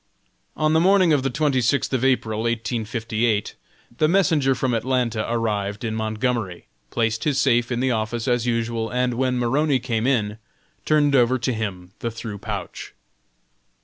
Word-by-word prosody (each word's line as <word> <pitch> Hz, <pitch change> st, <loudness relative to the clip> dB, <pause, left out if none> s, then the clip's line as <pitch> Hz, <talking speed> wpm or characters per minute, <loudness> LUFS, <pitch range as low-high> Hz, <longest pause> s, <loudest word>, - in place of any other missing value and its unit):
On 155 Hz, 0 st, +2 dB
the 160 Hz, -, +4 dB
morning 185 Hz, -1 st, +4 dB
of 145 Hz, -, +3 dB
the 135 Hz, -, -1 dB
twenty 140 Hz, -1 st, +1 dB
sixth 130 Hz, +3 st, +1 dB
of 130 Hz, -1 st, 0 dB
April, 115 Hz, -5 st, +1 dB
1858, 115 Hz, -1 st, -1 dB, 0.5 s
the 155 Hz, -, +4 dB
messenger 160 Hz, -7 st, +3 dB
from 130 Hz, 0 st, -1 dB
Atlanta 115 Hz, -2 st, -1 dB
arrived 105 Hz, -3 st, -2 dB
in 110 Hz, -2 st, -2 dB
Montgomery, 110 Hz, -3 st, -2 dB, 0.2 s
placed 115 Hz, -1 st, -1 dB
his 145 Hz, -3 st, +1 dB
safe 120 Hz, -3 st, +2 dB
in 120 Hz, 0 st, -1 dB
the 130 Hz, 0 st, +1 dB
office 110 Hz, +1 st, -2 dB
as 120 Hz, -1 st, +1 dB
usual, 115 Hz, -1 st, -1 dB
and 125 Hz, +1 st, 0 dB
when 125 Hz, +1 st, 0 dB
Maroney 135 Hz, +4 st, +2 dB
came 120 Hz, -2 st, -1 dB
in, 110 Hz, -5 st, 0 dB, 0.5 s
turned 145 Hz, -2 st, +3 dB
over 125 Hz, 0 st, +4 dB
to 125 Hz, +1 st, -1 dB
him 95 Hz, -5 st, -5 dB
the 115 Hz, -, -2 dB
through 110 Hz, -2 st, -7 dB
pouch. -, -, -6 dB
120 Hz, 160 wpm, -23 LUFS, 110-130 Hz, 0.5 s, the